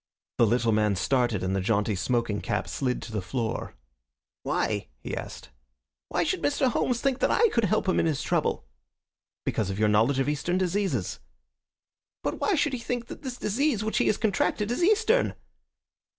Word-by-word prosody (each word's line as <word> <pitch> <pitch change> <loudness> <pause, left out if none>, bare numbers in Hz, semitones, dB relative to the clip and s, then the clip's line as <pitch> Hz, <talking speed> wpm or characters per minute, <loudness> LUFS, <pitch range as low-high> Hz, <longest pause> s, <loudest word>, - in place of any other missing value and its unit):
The 115 - +6
little 115 +1 +2
man 105 -1 +2
started, 120 0 +1
and 95 +1 0
the 95 - 0
jaunty 105 +1 +1
smoking 105 +2 0
cap 95 - -2
slid 125 -2 -2
to 115 - -8
the 105 -2 -2
floor. 110 +5 -3 0.7
"Why?" - - -1
he - - -5
asked. - - -8 0.6
"Why - - 0
should 365 +4 -1
Mr. 275 -3 +2
Homes 240 0 0
think 270 -2 +1
that - - +2
I 470 - +4
could 235 - +1
help 215 +1 +1
him 185 - +2
in - - +2
his 150 -4 -1
trouble?" - - 0 0.8
"Because 105 -3 0
of 95 - -3
your 105 0 +3
knowledge 110 +6 +3
of 135 - +1
Eastern 150 +5 0
diseases." 190 +2 -1 1.0
"But - - -2
why 410 - +2
should 295 -2 +1
he 255 - -2
think 240 0 -4
that - - -8
this 255 -3 -5
disease 235 +1 0
which 220 - 0
he - - +2
has 215 - +2
contracted 210 0 0
is 245 - 0
Eastern?" 440 +5 +3
165 Hz, 185 wpm, -27 LUFS, -, 1.0 s, The